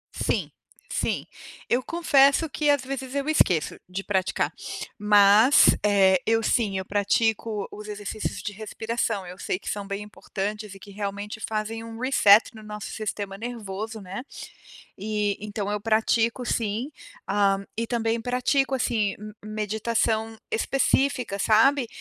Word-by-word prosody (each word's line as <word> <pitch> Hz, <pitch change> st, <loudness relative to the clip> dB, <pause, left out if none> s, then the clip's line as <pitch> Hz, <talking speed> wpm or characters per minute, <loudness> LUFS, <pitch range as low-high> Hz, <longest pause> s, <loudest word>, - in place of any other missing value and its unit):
Sim, -, -, -1 dB, 0.4 s
sim. -, -, -1 dB, 0.4 s
Eu 245 Hz, +2 st, +2 dB
confesso 290 Hz, -2 st, +4 dB
que 300 Hz, 0 st, 0 dB
às 285 Hz, -2 st, +3 dB
vezes 265 Hz, 0 st, -5 dB
eu 280 Hz, +1 st, -1 dB
esqueço 180 Hz, -, +2 dB
de 190 Hz, +2 st, -4 dB
praticar, 190 Hz, -2 st, 0 dB, 0.4 s
mas, 210 Hz, +4 st, +6 dB
eh, 190 Hz, -3 st, +4 dB
eu 225 Hz, 0 st, +2 dB
sim 205 Hz, -5 st, +1 dB
eu 190 Hz, -, -3 dB
pratico 210 Hz, +1 st, 0 dB
os 210 Hz, 0 st, -9 dB
exercícios 210 Hz, +1 st, -4 dB
de 205 Hz, -, -4 dB
respiração, 220 Hz, -1 st, -3 dB
eu 180 Hz, +1 st, -10 dB
sei -, -, -2 dB
que -, -, -15 dB
são 200 Hz, -1 st, -4 dB
bem 200 Hz, +1 st, -4 dB
importantes 210 Hz, 0 st, -5 dB
e -, -, -12 dB
que 200 Hz, -, -13 dB
realmente 205 Hz, +1 st, -5 dB
fazem 220 Hz, +1 st, -3 dB
um 225 Hz, 0 st, -9 dB
resert 235 Hz, -4 st, +5 dB
no 220 Hz, -, -11 dB
nosso 210 Hz, -1 st, -7 dB
sistema 205 Hz, -2 st, -4 dB
nervoso 220 Hz, -2 st, -5 dB
né. 195 Hz, +5 st, -6 dB, 0.7 s
E 210 Hz, 0 st, -1 dB
então 205 Hz, -1 st, -3 dB
eu 210 Hz, -, -2 dB
pratico 225 Hz, +2 st, +1 dB
sim, 230 Hz, +5 st, -1 dB, 0.4 s
hã, 195 Hz, 0 st, +2 dB
e 230 Hz, +1 st, -2 dB
também 230 Hz, -1 st, 0 dB
pratico, 260 Hz, +3 st, +1 dB
assim, 220 Hz, -5 st, 0 dB
m 210 Hz, 0 st, -9 dB
meditação 220 Hz, +1 st, -1 dB
específica, 255 Hz, -3 st, +1 dB
sabe. 240 Hz, +6 st, +4 dB
215 Hz, 140 wpm, -25 LUFS, 205-235 Hz, 0.7 s, mas